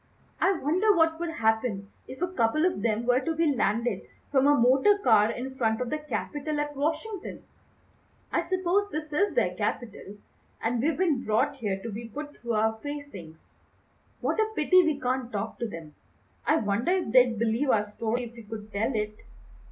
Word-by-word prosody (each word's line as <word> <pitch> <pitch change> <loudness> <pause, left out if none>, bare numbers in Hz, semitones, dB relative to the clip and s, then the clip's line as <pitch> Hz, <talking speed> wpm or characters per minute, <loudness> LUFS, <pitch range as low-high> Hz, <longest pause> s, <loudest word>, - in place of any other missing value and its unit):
"I 385 - +3
wonder 365 +6 +2
what 325 0 +3
would 345 0 -2
happen 220 -6 0 0.2
if 260 +6 -6
a - - +2
couple 305 +2 +2
of 360 - 0
them 225 +1 0
were 250 +1 +4
to 325 +5 -2
be 320 -2 +2
landed 235 0 0 0.3
from 275 -1 +4
a 290 - +6
motor 265 - +4
car 220 - +4
in 260 +3 -5
front 225 -4 0
of 250 -1 -3
the 305 - -1
Capitol 300 0 -3
at 295 0 -3
Washington. 320 +8 -3 0.9
I - - +2
suppose 375 +3 0
this 305 -4 -5
is 405 +7 +1
their - - +2
Capitol, 210 -3 -4 0.4
and 230 +1 0
we've 310 +4 +1
been 320 -9 +1
brought 220 +6 +1
here 205 -6 -2
to 230 - -5
be 225 +3 -7
put 295 +5 -7
through 235 -1 -4
our 220 +1 +1
facings. 285 - -7 0.8
What - - 0
a 440 0 +2
pity 365 +3 +5
we 310 -5 0
can't 255 -1 -2
talk 210 +2 -4
to 235 - -1
them! 165 -7 -9 0.5
I 310 - +5
wonder 225 - +1
if 370 - -1
they'd 245 -2 +5
believe 230 +5 0
our 210 -4 +3
story 225 +3 -2
if 235 -1 -8
we 235 - -11
could 215 -1 -9
tell 225 +5 -1
it." 210 0 -2
255 Hz, 190 wpm, -27 LUFS, 220-310 Hz, 0.9 s, a